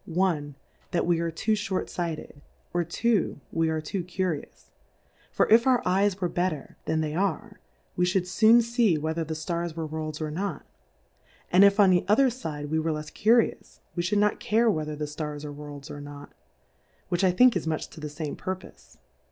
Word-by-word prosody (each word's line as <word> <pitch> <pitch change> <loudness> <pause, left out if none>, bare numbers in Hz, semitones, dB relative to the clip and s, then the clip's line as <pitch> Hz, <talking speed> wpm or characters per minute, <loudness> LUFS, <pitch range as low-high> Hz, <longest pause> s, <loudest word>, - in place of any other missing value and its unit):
i. 155 -6 +1 0.4
That 175 - 0
we 170 -1 +2
are 170 0 -1
too 165 +7 -2
fl)OYt 205 -3 -1
fight 170 -3 -3
ed^ 145 - -12 0.3
or, 175 0 +1
2. 205 +1 0
We 165 0 +1
are 160 0 0
too 175 +4 -4
curious:, 180 -3 -4 0.6
for, - - +2
if 230 +3 +6
our 255 -2 +5
Eyes 195 +1 +2
w^ere 180 -2 -3
better 175 -5 -2
than 160 0 0
they 150 -1 -2
are, 200 +4 -2 0.4
we 180 0 +2
fhould 180 0 +1
foon 225 +5 +5
fee 230 -7 +2
whether 160 +2 -2
the 160 0 -4
Stars 170 +1 -3
were 165 -1 -3
Worlds 155 0 -5
or 155 -1 -3
not; 180 -1 -4 0.9
and 185 +2 +7
if 200 +1 +5
on 195 -2 +7
the 180 -1 +3
other 250 +6 +4
fide 150 - -6
we 160 - +2
were 160 +1 0
lefs 150 0 -5
Curious, 230 +2 +1
we 175 - 0
fhould 195 +4 0
not 210 0 +2
care 225 +1 +3
whether 155 -4 -3
the 150 0 -3
Stars 150 0 -5
are 145 - -6
Worlds 145 -1 -9
or 145 - -7
not, 145 0 -10 0.8
which 175 +1 0
I 190 - +5
think 245 +6 +5
is 170 -3 -2
much 155 -1 -2
to - - -11
the 150 -1 -5
fame 150 0 -5
Purpofe. 185 0 -8
175 Hz, 200 wpm, -27 LUFS, 155-200 Hz, 0.9 s, and